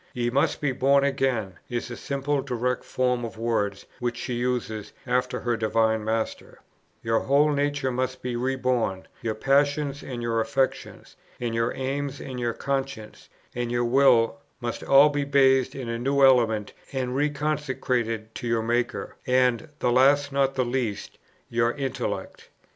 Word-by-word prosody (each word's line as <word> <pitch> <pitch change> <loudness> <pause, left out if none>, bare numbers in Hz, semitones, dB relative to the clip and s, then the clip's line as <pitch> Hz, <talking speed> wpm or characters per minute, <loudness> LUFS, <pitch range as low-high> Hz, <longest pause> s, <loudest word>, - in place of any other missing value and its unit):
"Ye 120 -1 0
must 145 +4 +1
be 145 -3 +1
born 135 +2 +3
again," 130 -8 0
is 120 0 -3
the 120 - -5
simple, 140 +2 -1
direct 125 -1 -2
form 125 -1 0
of 115 -1 -6
words 110 -4 -1
which 120 0 -2
she 125 - -4
uses 120 -3 -2
after 125 0 0
her 120 -1 0
Divine 110 0 +1
Master: 110 +1 -3 0.5
"your 115 0 +2
whole 145 +2 +3
nature 145 -2 0
must 130 +1 -3
be 125 -1 -2
re 130 +2 0
born; 125 -7 -1
your 115 -3 -2
passions, 140 +3 +1
and 120 -3 -6
your 115 -1 +1
affections, 130 +4 -2 0.2
and 120 -2 -2
your 115 0 +1
aims, 140 +1 -3
and 130 -2 -6
your 120 -1 -1
conscience, 135 -5 -4 0.2
and 120 -1 -3
your 120 0 +1
will, 125 -1 +4 0.2
must 120 -1 -4
all 140 +2 +7
be 145 -1 -1
bathed 135 -2 +3
in 130 -3 -5
a 115 0 -3
new 135 +3 +2
element, 115 -5 +3 0.2
and 130 -2 -2
reconsecrated 135 -6 -1
to 120 - -5
your 115 -1 +1
Maker, 120 +1 -1
and, 125 +3 +2
the 125 - +1
last 140 +3 +4
not 135 0 +1
the 130 -1 +1
least, 120 -4 -3 0.3
your 115 0 +1
intellect." 135 -3 -4
125 Hz, 160 wpm, -25 LUFS, 115-135 Hz, 0.5 s, all